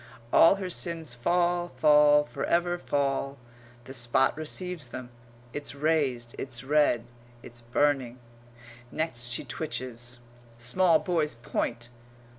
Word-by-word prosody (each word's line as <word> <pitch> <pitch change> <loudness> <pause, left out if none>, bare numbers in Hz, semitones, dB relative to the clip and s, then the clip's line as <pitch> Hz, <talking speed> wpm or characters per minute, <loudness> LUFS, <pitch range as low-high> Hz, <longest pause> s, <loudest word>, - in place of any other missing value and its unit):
All 165 - +7
her 195 -1 -4
sins 165 -7 -3
fall, 175 +6 0
fall, 150 -1 +6
for 150 - -6
ever 175 +1 +1
fall. 140 -2 -1 0.5
The 130 - -10
spot 125 +1 +2
receives 155 -1 -3
them. 125 0 -8 0.4
It's 145 -2 -5
raised, 140 -6 0
it's 130 -2 -5
red, 145 -4 +2 0.4
it's 120 0 -9
burning. 130 0 0 0.7
Next 140 -7 -2
she 120 - -2
twitches. 120 -5 -5 0.4
Small 165 +8 +3
boys 160 -5 0
point. 120 0 -3
145 Hz, 115 wpm, -28 LUFS, 120-165 Hz, 0.7 s, All